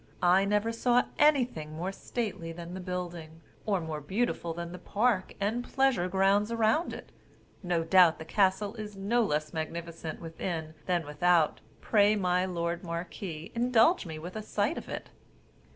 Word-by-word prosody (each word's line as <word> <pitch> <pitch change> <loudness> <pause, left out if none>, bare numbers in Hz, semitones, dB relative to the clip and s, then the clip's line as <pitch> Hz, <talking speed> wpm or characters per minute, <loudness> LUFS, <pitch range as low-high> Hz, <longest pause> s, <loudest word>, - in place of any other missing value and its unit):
I 180 +2 +5
never 210 +3 +1
saw 245 +2 +3 0.2
anything 250 - +3
more 175 +5 -3
stately 195 -5 -4
than 170 +1 -8
the 190 - -5
building, 175 -3 -6 0.3
or 200 -3 +2
more 160 -2 -5
beautiful 185 +1 -1
than 170 +1 -5
the 180 - -8
park 210 +1 0
and 220 +5 0
pleasure 265 -10 +1
grounds 195 +3 +2
around 230 +8 +2
it; - - -9 0.5
no 175 -3 0
doubt 175 -1 +6
the 160 - -8
castle 200 +3 +1
is 210 -2 -7
no 215 +5 +1
less 150 -6 -1
magnificent 165 0 -5
within 165 -1 -5
than 175 -3 +1
without: 160 +2 +2 0.2
pray, 210 -1 +4
my 180 -2 +1
lord 170 -1 -2
marquis, 170 0 -5
indulge 240 - +3
me 160 -1 -6
with 175 +5 -8
a 215 - -3
sight 210 +7 -1
of - - -12
it." - - -6
180 Hz, 160 wpm, -29 LUFS, 170-215 Hz, 0.5 s, doubt